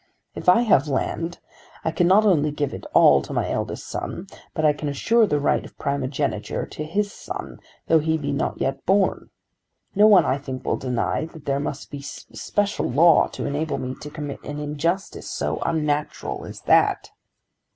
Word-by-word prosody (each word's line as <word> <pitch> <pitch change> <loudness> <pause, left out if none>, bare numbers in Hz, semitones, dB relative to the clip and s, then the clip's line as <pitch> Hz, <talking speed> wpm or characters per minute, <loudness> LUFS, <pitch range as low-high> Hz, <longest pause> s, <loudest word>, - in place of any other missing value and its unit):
If - - 0
I 185 +6 +6
have 175 - +3
land 165 +5 -2 0.5
I 160 - +1
can 170 +2 +2
not 205 +4 +5
only 155 -7 +3
give 145 -1 -2
it - - -7
all 70 -1 +6
to - - -7
my - - 0
eldest - - -3
son, 180 - -5 0.3
but 155 -3 +1
I 150 - +5
can 145 0 -4
assure 225 - +3
the 150 -5 +1
right 145 - +1
of - - -13
primogeniture 140 -6 -2
to 155 - -7
his 200 +6 -1
son, - - -7 0.3
though 160 - +4
he 160 +1 +1
be 145 -2 -3
not 140 - -2
yet 135 - -2
born. 195 +1 +2 0.6
No 210 +1 +6
one 205 -3 +7
I 135 - +1
think 130 -2 -7
will - - 0
deny 125 +4 -1
that 160 -2 -13
there 140 0 0
must 145 0 -5
be 145 - -6
a - - -9
special 205 +8 -3
law 165 +7 +5
to - - -6
enable 145 +2 -2
me 130 0 -4
to 150 - -7
commit 150 -2 -6
an 145 +1 -6
injustice 150 +6 -2
so - - -2
unnatural 150 -2 -2
as - - -9
that. - - +3
150 Hz, 190 wpm, -23 LUFS, 140-175 Hz, 0.6 s, one